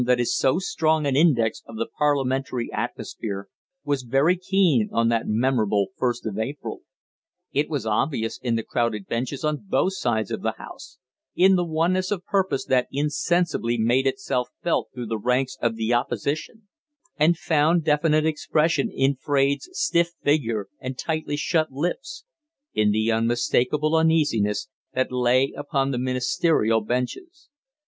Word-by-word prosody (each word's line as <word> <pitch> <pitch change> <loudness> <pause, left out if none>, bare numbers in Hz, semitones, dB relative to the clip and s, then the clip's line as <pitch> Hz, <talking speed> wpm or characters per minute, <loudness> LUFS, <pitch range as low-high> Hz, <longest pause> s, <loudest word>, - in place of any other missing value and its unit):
that 125 0 +3
is 120 - +1
so 130 - +2
strong 160 -4 +1
an 140 -2 +1
index 135 -8 +3
of 115 - -10
the 115 +1 -1
parliamentary 135 -4 0
atmosphere 100 -3 -4 0.4
was 140 -2 -1
very 135 +8 +2
keen 180 - +2
on 115 0 +2
that 115 -1 0
memorable 105 -4 +1
first 120 -1 -1
of 105 -1 -3
April. 135 +6 -4 0.7
It 145 +2 0
was 145 -7 -2
obvious 115 +1 -1
in 120 -2 0
the 115 - -1
crowded 115 -5 -1
benches 130 +6 -3
on 150 +2 -1
both 190 - +2
sides 115 - -1
of - - -3
the - - -1
House - - -11 0.4
in 190 +2 +5
the 180 - +2
oneness 175 +3 0
of 190 -4 -3
purpose 190 -8 0
that 130 -1 +2
insensibly 150 -3 0
made 120 +4 +2
itself 135 -5 -1
felt 170 - 0
through 125 -1 -6
the 110 -1 -3
ranks 125 +3 0
of 115 -1 +1
the 115 +1 0
Opposition, 145 - -2 0.5
and 160 +2 +3
found 160 +1 +2
definite 155 0 +2
expression 155 +5 +1
in 135 -5 +1
Fraide's 140 - 0
stiff 170 - +1
figure 115 -8 +1
and 130 0 -6
tightly 155 -1 -2
shut 155 +1 0
lips 180 - -4 0.5
in 105 -1 +2
the 110 +2 +1
unmistakable 120 +6 +1
uneasiness 150 -12 +2 0.3
that 130 0 0
lay 125 +2 +2
upon 140 -1 -1
the 125 - -1
ministerial 125 -2 +1
benches. 125 - -4
135 Hz, 150 wpm, -24 LUFS, 120-160 Hz, 0.7 s, in